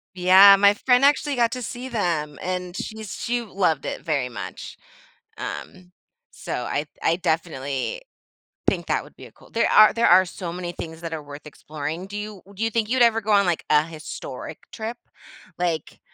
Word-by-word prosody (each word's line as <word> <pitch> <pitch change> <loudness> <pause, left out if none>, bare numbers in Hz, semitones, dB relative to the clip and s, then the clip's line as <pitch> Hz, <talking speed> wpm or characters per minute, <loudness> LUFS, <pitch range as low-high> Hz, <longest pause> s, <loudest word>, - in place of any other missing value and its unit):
Yeah, 190 +2 +8
my 200 +1 +5
friend 250 +4 +3
actually 285 0 +3
got 235 -1 +2
to 255 0 -4
see 250 +2 -6
them 165 - -1
and 180 0 -4
she's 215 -2 -6
she 240 0 -2
loved 185 -9 0
it - - -4
very 140 -6 0
much. 120 - -8 0.6
Um, 185 -1 -7 0.4
so - - -7
I 145 +4 -2 0.2
I 165 - +2
definitely 160 - -2 0.7
think - - +1
that - - 0
would - - -17
be - - -12
a - - -14
cool - - -20
There 230 - +1
are, 215 0 +7
there 230 0 +2
are 185 +2 +7
so 175 0 -6
many 175 0 -5
things 160 -1 -8
that 165 -1 -5
are 155 - -4
worth 145 +1 -11
exploring, 155 +4 -6
do 205 +1 -7
you 210 -3 -7
do 220 - -3
you 225 - 0
think 220 -1 0
you'd 255 0 +4
ever 225 -1 +4
go 215 0 -2
on 200 -1 +5
like 175 -2 0
a 150 0 +5
historic 160 -2 -8
trip, 225 +2 -5 0.6
like 170 -4 -2
185 Hz, 190 wpm, -23 LUFS, 160-220 Hz, 0.7 s, Yeah